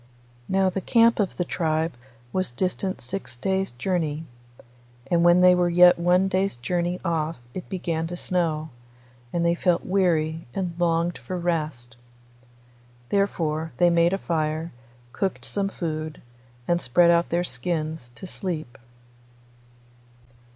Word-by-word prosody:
Now 190 0 +2
the 195 - -3
camp 230 +2 +4
of 200 -3 0
the 175 - 0
tribe 160 -1 -1 0.4
was 185 -7 0
distant 185 +6 -2
six 185 -11 -6
days' 190 +7 -1
journey, 160 +3 -2 0.9
and 170 -1 +4
when 175 +1 +6
they 180 0 +7
were 180 -1 +2
yet 175 0 +6
one 180 +2 +3
day's 190 -2 0
journey 175 +8 -2
off 165 -1 -1 0.2
it 185 - -7
began 165 -3 -2
to 175 +1 -6
snow, 160 -4 -1 0.6
and 170 0 0
they 170 - +4
felt 175 0 +1
weary 165 -5 +1
and 180 -3 -2
longed 170 0 +1
for 185 - -5
rest. 155 -9 -3 1.1
Therefore 160 -5 0
they 175 -1 +4
made 170 0 +4
a 195 - +1
fire, 160 -2 -2 0.4
cooked 190 +6 -2
some 200 -1 -1
food, 155 -4 -4 0.5
and 175 0 +2
spread 170 +8 +4
out 170 0 +2
their 175 +1 +1
skins 155 -1 -3
to - - -8
sleep. 160 - -5
170 Hz, 135 wpm, -25 LUFS, 160-185 Hz, 1.1 s, they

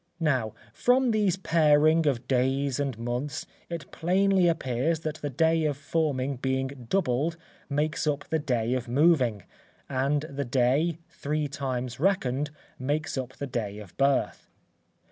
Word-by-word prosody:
Now 130 -9 0 0.2
from 250 0 +3
these 205 -4 +2
paring 155 -2 +4
of 125 -3 0
days 135 +1 +1
and 135 -5 -1
months, 130 +7 -3 0.2
it 165 -6 -6
plainly 190 +1 +3
appears 155 0 0
that 155 0 -3
the 145 -1 -4
day 160 +4 +2
of 145 -3 0
forming 140 -3 -1
being 130 -1 -2
doubled, 160 -2 +1 0.3
makes 150 +2 0
up 145 -1 -1
the 160 - 0
day 120 -4 0
of 130 -1 -2
moving, 125 - +3 0.4
and 140 +2 +1
the 140 -2 -4
day, 135 +6 +2
three 150 +1 -2
times 130 -3 -4
reckoned, 150 -6 +1 0.3
makes 145 +4 -1
up 130 -1 -4
the 140 - -5
day 110 -6 -3
of 105 -4 -11
birth. 140 0 +1
140 Hz, 145 wpm, -27 LUFS, 130-160 Hz, 0.4 s, paring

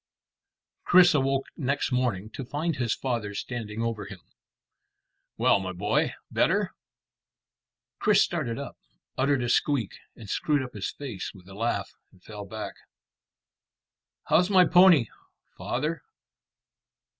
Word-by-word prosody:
Chris 180 -1 +6
awoke 135 -1 +1
next 140 -1 -1
morning 120 -6 0
to 135 - -6
find 150 +5 -2
his 120 -3 0
father 115 -6 -3
standing 115 -1 -4
over 115 -3 -3
him. 95 - -9 1.2
"Well, - - +4
my 95 -1 -4
boy; 105 +4 0 0.2
better?" - - +2 1.3
Chris - - +4
started 115 -1 -2
up, 140 - -7 0.4
uttered 135 -1 +1
a - - -1
squeak 125 -4 +1 0.2
and 110 - -11
screwed 145 +7 0
up 125 - -8
his 100 -2 -3
face 125 -10 -6
with 90 -1 -16
a 95 - -11
laugh, 115 +4 -2 0.2
and 90 - -24
fell 105 -2 -8
back. 110 +1 -6 1.5
"How's 180 +3 +3
my 185 -3 +6
pony, 175 -6 +6 0.5
father?" 150 +7 -2
125 Hz, 125 wpm, -27 LUFS, 105-145 Hz, 1.5 s, Chris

